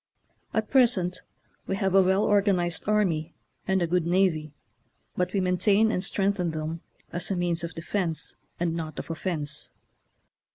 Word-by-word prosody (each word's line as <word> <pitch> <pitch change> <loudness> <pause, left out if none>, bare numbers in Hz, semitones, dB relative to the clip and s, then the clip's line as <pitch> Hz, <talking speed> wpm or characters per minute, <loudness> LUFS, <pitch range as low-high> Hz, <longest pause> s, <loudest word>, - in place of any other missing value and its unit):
At 220 -1 -2
present 225 -9 +3 0.5
we 195 - -1
have 195 -1 0
a 195 - +7
well 190 +2 +3
organized 195 -5 +2
army 175 -7 +1 0.3
and 190 -1 +2
a - - +3
good 170 0 0
navy, 170 -4 +1 0.6
but 180 0 0
we 200 - 0
maintain 195 +4 +3
and 185 - -1
strengthen 195 -3 0
them 160 +1 -4 0.3
as 175 0 0
a 195 - 0
means 175 -1 0
of 170 0 -5
defence 165 -1 -1 0.2
and 170 -1 0
not 160 -2 -5
of - - -5
offence. 155 -3 -1
180 Hz, 155 wpm, -26 LUFS, 165-195 Hz, 0.6 s, a